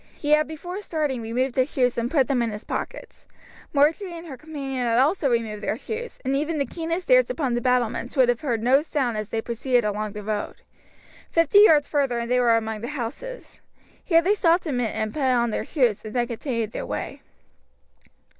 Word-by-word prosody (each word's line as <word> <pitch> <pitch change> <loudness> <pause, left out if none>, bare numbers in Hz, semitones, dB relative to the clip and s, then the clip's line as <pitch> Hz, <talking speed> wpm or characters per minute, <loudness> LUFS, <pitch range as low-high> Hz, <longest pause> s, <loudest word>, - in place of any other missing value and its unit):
He 295 - -2
had 305 0 +4
before 350 +5 -6
starting 300 - -2
removed 245 +3 -1
his 260 +2 +1
shoes 250 -2 +1
and 235 0 -1
put 275 -4 +2
them 260 -3 +1
in 235 - 0
his 210 0 -6
pockets. - - -6 0.4
Marjory 330 +5 +1
and 335 - -9
her 290 -5 -7
companion 275 -1 -6
had 230 0 +2
also 290 +3 +3
removed 225 -3 -1
their 215 - -2
shoes, 465 - -6
and 265 +1 +1
even 305 +3 -1
the 280 - +1
keenest 335 - -4
ears - - +6
upon 285 - -1
the 240 - 0
battlements 250 +1 0
would 255 -2 +5
have 240 -1 +1
heard 235 -6 -1
no 260 +4 +5
sound 275 -7 -1
as 215 -1 -4
they 225 0 -2
proceeded 240 0 0
along 210 0 -2
the 210 -1 -7
road. 210 0 -4 0.7
Fifty 330 +4 +4
yards 310 -9 +6
farther 275 -5 0
and 235 0 -3
they 250 - +4
were 235 -2 +4
among 220 -1 -3
the 235 - -4
houses. 295 - -6 0.4
Here 330 -2 +4
they 390 +4 +3
stopped 350 -4 +2
a 310 - -2
minute 245 -4 -1
and 215 -1 -2
put 305 - -4
on 245 -3 +2
their - - -2
shoes, 245 - +1
and 215 +1 -8
then 240 -1 +2
continued 230 -2 -3
their - - -4
way. - - -5
260 Hz, 210 wpm, -24 LUFS, 235-310 Hz, 0.7 s, ears